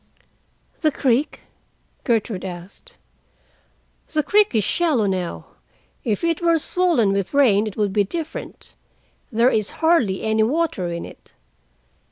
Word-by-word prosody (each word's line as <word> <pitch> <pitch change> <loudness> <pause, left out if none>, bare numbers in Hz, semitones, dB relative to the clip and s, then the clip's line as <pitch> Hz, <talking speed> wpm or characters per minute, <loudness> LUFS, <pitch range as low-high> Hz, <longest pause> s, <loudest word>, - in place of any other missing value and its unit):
"The 310 - +2
creek?" 265 +1 0 0.6
Gertrude 225 -5 0
asked. 190 - -10 1.2
"The 305 -1 +1
creek 410 - +3
is 215 - +3
shallow 305 - +1
now. 185 -3 -3 0.6
If 220 0 -1
it 335 -1 0
were 335 -1 +3
swollen 320 - +2
with 195 +6 -2
rain, 220 -7 +4
it 210 - -7
would 205 -3 0
be 205 -1 +3
different. 325 - -7 0.6
There 235 +3 +3
is 215 -2 0 0.2
hardly 250 - +2
any 220 0 +1
water 265 - 0
in 170 0 -5
it. - - -12
230 Hz, 130 wpm, -21 LUFS, 200-320 Hz, 1.2 s, rain